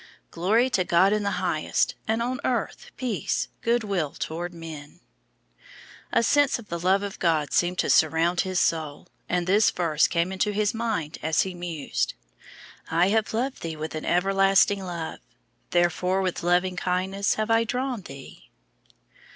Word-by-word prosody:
"Glory 215 +9 +2
to 195 -8 +1
God 185 +3 +4
in 215 - +1
the 200 - 0
highest, 155 -3 0
and 225 +1 +1
on 255 +2 -2
earth 240 -4 -2
peace, 210 -6 -2
good 235 0 +1
will 180 -8 -2
toward 170 +2 -4
men." 160 -2 -10 1.1
A - - +3
sense 285 +2 +3
of 230 -4 -13
the 170 - -3
love 190 +3 +2
of 200 -1 -6
God 160 -4 +1
seemed 180 +1 +1
to - - 0
surround 160 +3 +3
his 185 -2 -1
soul, 155 -3 -1 0.2
and 180 -1 0
this 205 +4 +4
verse 165 -7 +1
came 170 +2 0
into 205 +2 0
his 210 0 +1
mind 220 -9 -3
as 160 0 +2
he 190 - -5
mused: 175 -4 -3 0.7
"I 170 +3 +3
have 220 +1 +1
loved 255 +4 -2
thee 165 -1 -4
with 155 0 -5
an 155 - -5
everlasting 195 +2 +3
love, 170 -3 -5 0.5
therefore 180 +2 +1
with 185 -2 -2
loving 180 +1 +1
kindness 190 +3 0
have 215 +1 -1
I 225 0 +4
drawn 250 0 -2
thee." 135 - -12
185 Hz, 160 wpm, -25 LUFS, 170-210 Hz, 1.1 s, God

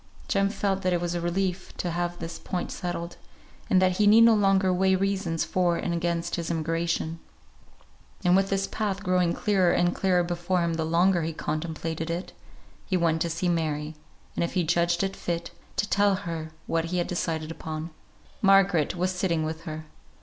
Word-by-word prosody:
Jem 195 -1 +2
felt 195 -2 -1
that 185 -1 +1
it 175 - +1
was 175 0 -2
a 175 - -2
relief 180 +1 -2
to 175 - -2
have 175 +1 -2
this 165 0 -6
point 180 -2 -4
settled; 175 -2 -4 0.5
and 185 - +5
that 185 -1 +2
he 210 - +4
need 220 +2 +7
no 230 0 +7
longer 195 -3 +3
weigh 190 +1 +3
reasons 190 -4 0
for 175 -2 +1
and 170 - -2
against 170 0 -1
his 170 -1 -3
emigration. 165 0 -1 1.1
And 180 0 +5
with 195 0 +3
his 195 0 +1
path 200 -2 -3
growing 180 -2 +2
clearer 190 -4 +2
and 175 0 +2
clearer 180 -2 +2
before 175 +1 -1
him 170 -1 0
the 160 -1 -1
longer 175 +2 +3
he 165 0 -2
contemplated 160 +1 -3
it, 170 +2 -4 0.5
he 185 - +1
went 165 -2 +1
to 170 - +1
see 165 +2 -1
Mary, 155 -3 -1 0.4
and - - -1
if 170 - -2
he 180 - +2
judged 170 +2 +1
it 195 0 -2
fit, 170 -1 -3 0.2
to 210 - 0
tell 200 -1 +3
her 165 -4 -5 0.2
what 165 0 0
he 180 +2 -2
had 175 - +1
decided 160 -2 -2
upon. 160 0 -6 0.5
Margaret 195 -5 +4
was 180 +1 0
sitting 180 -3 0
with 160 +2 -5
her. 155 -1 -6
175 Hz, 190 wpm, -26 LUFS, 165-190 Hz, 1.1 s, need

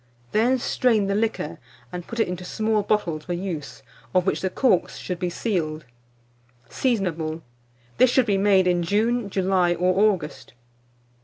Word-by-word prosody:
Then 240 +5 +3
strain 235 -4 +1
the 200 - 0
liquor, 215 -7 -2 0.3
and 175 -1 -7
put 230 - -6
it - - +3
into 180 0 -5
small 215 +3 0
bottles 170 -7 -1
for 175 - -3
use, 165 -7 -5 0.3
of 180 -1 +3
which 190 - 0
the 190 - 0
corks 190 -2 +1
should 180 -2 -5
be 180 -1 -1
sealed. 160 - -2 0.8
Seasonable. 170 - -1 0.6
This 255 - +6
should 255 0 +3
be 200 -3 +1
made 195 -2 +4
in 175 -1 +2
June, 215 +5 0
July, 185 -2 +2
or 185 +4 +3
August. 160 -10 -7
190 Hz, 155 wpm, -24 LUFS, 175-215 Hz, 0.8 s, This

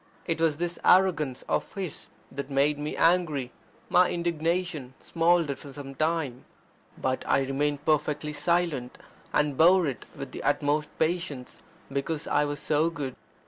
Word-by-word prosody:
It 165 -1 -1
was 160 -3 +2
this 175 +1 -3
arrogance 165 -8 +3
of - - -1
his 190 -6 -5 0.2
that 140 +1 -5
made 145 +2 +2
me 150 +1 -4
angry. 160 -7 +2 0.4
My 180 0 +5
indignation 170 -4 -1
smouldered 165 -4 +2
for 140 - -10
some 135 -1 -8
time. 155 -4 -1 0.5
But 130 0 -1
I - - +3
remained 145 +2 -1
perfectly 150 0 +1
silent, 150 -4 0 0.3
and 150 -1 +1
bore 175 +4 +6
it 135 -5 -4
with - - -7
the - - -6
utmost 150 +1 +1
patience, 160 -6 -2 0.3
because 145 +3 -2
I 145 0 +2
was 145 0 -3
so 155 +2 +2
good. 145 -6 -5
150 Hz, 145 wpm, -27 LUFS, 140-170 Hz, 0.5 s, bore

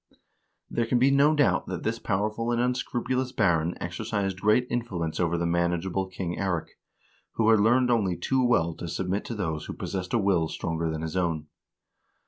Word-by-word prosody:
There 115 -1 -1
can 125 - +2
be 130 +3 +4
no 145 +3 +4
doubt 145 -2 +2
that 90 -3 -4
this 115 +1 -1
powerful 110 +4 -1
and 120 - +1
unscrupulous 125 +1 -1
baron 85 -1 +1
exercised 95 +1 -3
great 105 +4 +3
influence 95 -11 -3
over 85 -1 +1
the 85 - -1
manageable 85 +2 0
King 95 -2 -4
Eirik, 90 -4 -1 0.6
who 115 0 +3
had 110 - +5
learned 125 +4 +4
only 100 -7 +1
too 130 +9 +1
well 85 -9 +2
to 85 - -6
submit 95 +4 -2
to 115 - -5
those 80 -7 -3
who - - -6
possessed 95 +2 -4
a - - +4
will 95 -6 +2
stronger 80 +1 -2
than 80 0 -3
his 80 +2 -4
own. 85 -4 -1
95 Hz, 180 wpm, -27 LUFS, 85-120 Hz, 0.6 s, had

